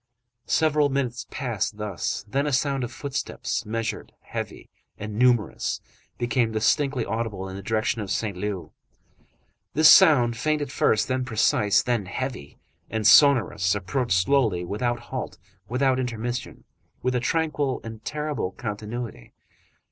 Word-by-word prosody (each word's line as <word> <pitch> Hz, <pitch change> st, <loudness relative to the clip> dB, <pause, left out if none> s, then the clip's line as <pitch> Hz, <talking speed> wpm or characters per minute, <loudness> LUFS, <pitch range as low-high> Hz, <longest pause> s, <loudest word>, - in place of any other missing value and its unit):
Several 150 Hz, -2 st, +3 dB
minutes 135 Hz, -3 st, -2 dB
passed 115 Hz, -5 st, -3 dB
thus, 105 Hz, -2 st, -3 dB
then 140 Hz, +7 st, 0 dB
a -, -, 0 dB
sound 135 Hz, 0 st, +1 dB
of 120 Hz, -, -4 dB
footsteps, 135 Hz, -3 st, -4 dB
measured, 115 Hz, 0 st, -4 dB
heavy, -, -, -6 dB, 0.3 s
and 105 Hz, +1 st, -6 dB
numerous, 120 Hz, -1 st, +1 dB, 0.4 s
became 120 Hz, -1 st, +1 dB
distinctly 135 Hz, +3 st, +1 dB
audible 110 Hz, -4 st, -3 dB
in 95 Hz, -, -7 dB
the 100 Hz, -, -6 dB
direction 110 Hz, +2 st, -1 dB
of 100 Hz, -, -5 dB
Saint 100 Hz, 0 st, -1 dB
Leu. 95 Hz, -1 st, -4 dB, 1.0 s
This 155 Hz, +1 st, +8 dB
sound, 125 Hz, -7 st, +6 dB
faint 155 Hz, +5 st, 0 dB
at 145 Hz, -3 st, -4 dB
first, 110 Hz, -6 st, +2 dB
then 130 Hz, 0 st, 0 dB
precise, 105 Hz, -4 st, +2 dB
then 120 Hz, -6 st, -1 dB
heavy 110 Hz, -, -5 dB, 0.3 s
and 110 Hz, -1 st, -2 dB
sonorous, 110 Hz, -7 st, +5 dB
approached 100 Hz, +2 st, 0 dB
slowly, 105 Hz, -5 st, +2 dB
without 120 Hz, +6 st, -1 dB
halt, 125 Hz, +2 st, -6 dB, 0.3 s
without 130 Hz, +1 st, +2 dB
intermission, 120 Hz, 0 st, -4 dB, 0.4 s
with 125 Hz, +1 st, +1 dB
a 125 Hz, -, +1 dB
tranquil 150 Hz, 0 st, 0 dB
and 110 Hz, -1 st, -9 dB
terrible 150 Hz, -10 st, -3 dB
continuity. 110 Hz, -, -6 dB
120 Hz, 135 wpm, -25 LUFS, 105-135 Hz, 1.0 s, This